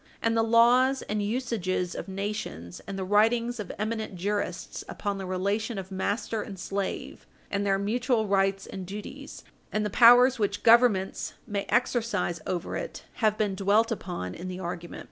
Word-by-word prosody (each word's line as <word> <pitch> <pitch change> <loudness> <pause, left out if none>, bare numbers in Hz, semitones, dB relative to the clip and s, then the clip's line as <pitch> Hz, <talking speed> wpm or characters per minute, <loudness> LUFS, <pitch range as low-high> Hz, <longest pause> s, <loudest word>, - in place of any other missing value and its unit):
And 230 0 +1
the 225 - +4
laws 245 +4 +4
and 210 0 -2
usages 205 -6 -1
of - - -6
nations, 195 - -5
and 195 -1 -5
the 190 - -2
writings 230 +4 +2
of 205 - -5
eminent 220 -1 -3
jurists 200 +3 -3
upon 200 -2 -3
the 190 - -5
relation 200 +4 -1
of 190 0 -6
master 205 +3 -2
and 200 -2 -7
slave 195 +2 -4 0.2
and 200 0 0
their 195 0 +3
mutual 230 +3 0
rights 195 -1 +1
and 190 -2 -7
duties, 205 +2 -8 0.3
and 215 0 0
the 210 - -2
powers 245 +3 +7
which 205 -1 -1
Governments 225 -5 +4
may 205 -3 -3
exercise 230 -9 0
over 180 -1 -2
it - - -5 0.2
have 215 -1 +3
been 210 -3 0
dwelt 205 +4 +2
upon 175 - -4
in 180 - -7
the 185 0 -5
argument. 175 -1 -6
205 Hz, 165 wpm, -27 LUFS, 190-230 Hz, 0.3 s, powers